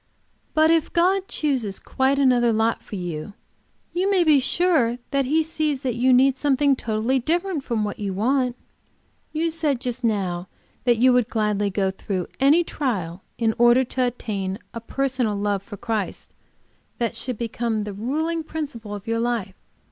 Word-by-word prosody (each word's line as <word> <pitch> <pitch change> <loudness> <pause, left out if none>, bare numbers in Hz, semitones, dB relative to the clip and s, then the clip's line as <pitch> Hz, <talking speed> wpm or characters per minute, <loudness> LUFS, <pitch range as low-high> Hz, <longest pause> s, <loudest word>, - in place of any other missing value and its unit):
"But 315 +1 +5
if 330 -2 +2
God 370 +3 +2
chooses 255 -10 -1
quite 265 +1 0
another 250 -4 +4
lot 225 +1 +1
for - - -8
you, 175 +1 -5 0.6
you 370 +3 +1
may 380 -3 +4
be 305 -4 +5
sure 270 -5 +2
that 275 -1 +1
He 315 +5 +2
sees 305 -3 -1
that 255 -2 0
you 250 +3 +2
need 260 +1 +5
something 280 0 +3
totally 230 +2 0
different 335 +3 -1
from 230 -4 -1
what 205 -1 -4
you 200 -2 -2
want. 250 +5 +1 0.8
You 325 +1 0
just 265 -6 -1
now 190 -5 -1 0.4
that 240 -2 +4
you 255 +2 +5
would 245 -2 +2
gladly 210 -2 0
go 190 -1 0
through 190 -1 -4
any 290 +6 +5
trial 195 - -3 0.2
in 225 -1 +1
order 240 +2 +6
to 255 0 0
attain 200 -5 -3 0.2
a 230 - -6
personal 255 -3 -1
love 200 -1 -1
to 205 - -8
Christ 220 -3 -3 0.6
that 235 -2 -1
should 250 -3 -2
become 230 -1 -2
the 205 -1 -5
ruling 315 +10 -2
principle 275 -10 -5
of 205 0 -9
your 230 0 -1
life. 230 -5 -1
245 Hz, 165 wpm, -23 LUFS, 215-280 Hz, 0.8 s, order